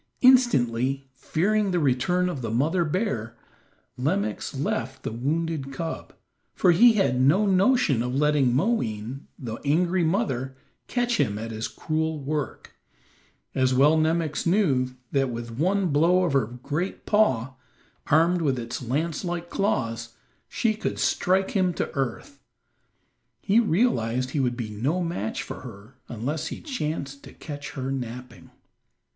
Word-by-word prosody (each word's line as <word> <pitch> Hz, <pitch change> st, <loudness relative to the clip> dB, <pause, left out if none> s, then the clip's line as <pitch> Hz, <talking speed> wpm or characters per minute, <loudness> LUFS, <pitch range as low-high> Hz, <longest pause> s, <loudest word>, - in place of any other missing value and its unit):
Instantly, 135 Hz, -, +3 dB
fearing 200 Hz, +10 st, 0 dB
the 180 Hz, -, 0 dB
return 165 Hz, +5 st, +1 dB
of 150 Hz, -7 st, -4 dB
the 115 Hz, -, -3 dB
mother 155 Hz, +10 st, +1 dB
bear, 155 Hz, -, -2 dB, 0.6 s
Nemox 145 Hz, -, -1 dB
left 130 Hz, -1 st, -3 dB
the -, -, -3 dB
wounded 145 Hz, +3 st, -2 dB
cub, 160 Hz, +4 st, -5 dB, 0.4 s
for 180 Hz, -, +4 dB
he 230 Hz, +7 st, +7 dB
had 160 Hz, -, +2 dB
no 165 Hz, +11 st, +4 dB
notion 195 Hz, -, +3 dB
of 125 Hz, +1 st, -2 dB
letting 145 Hz, -3 st, +3 dB
Moween, 125 Hz, -, -1 dB
the 115 Hz, -4 st, -6 dB
angry 175 Hz, +5 st, +2 dB
mother, 135 Hz, -, -1 dB, 0.3 s
catch 245 Hz, -1 st, 0 dB
him 105 Hz, 0 st, +1 dB
at 115 Hz, +1 st, -5 dB
his 110 Hz, 0 st, -3 dB
cruel 160 Hz, 0 st, -2 dB
work, 145 Hz, -1 st, -4 dB, 0.8 s
as 130 Hz, -1 st, +2 dB
well 145 Hz, +4 st, +5 dB
Nemox 160 Hz, 0 st, 0 dB
knew 150 Hz, -10 st, +2 dB, 0.2 s
that 135 Hz, -2 st, +1 dB
with 120 Hz, 0 st, -5 dB
one 190 Hz, +3 st, +2 dB
blow 170 Hz, +5 st, +3 dB
of 170 Hz, -6 st, 0 dB
her 135 Hz, -6 st, +2 dB
great 145 Hz, -, -4 dB
paw, 130 Hz, -, +2 dB, 0.5 s
armed 170 Hz, +3 st, +3 dB
with 140 Hz, -5 st, +1 dB
its 120 Hz, +1 st, -5 dB
lance 150 Hz, +8 st, -2 dB
like 175 Hz, -1 st, -4 dB
claws, 115 Hz, -, -1 dB, 0.3 s
she 225 Hz, -2 st, +1 dB
could 215 Hz, -, -3 dB
strike 190 Hz, +1 st, +1 dB
him 185 Hz, -3 st, +1 dB
to -, -, -2 dB
earth. 140 Hz, -, -4 dB, 1.0 s
He 210 Hz, +3 st, +3 dB
realized 130 Hz, -, +1 dB
he 145 Hz, -, -1 dB
would 125 Hz, -2 st, 0 dB
be 115 Hz, -4 st, -4 dB
no 140 Hz, -, -1 dB
match 165 Hz, -, -3 dB
for -, -, -7 dB
her 105 Hz, +6 st, -12 dB
unless 145 Hz, +8 st, -3 dB
he -, -, -6 dB
chanced 150 Hz, -, -4 dB
to -, -, -12 dB
catch 145 Hz, -1 st, -8 dB
her 135 Hz, -1 st, -3 dB
napping. 125 Hz, -1 st, -6 dB
145 Hz, 145 wpm, -25 LUFS, 125-180 Hz, 1.0 s, he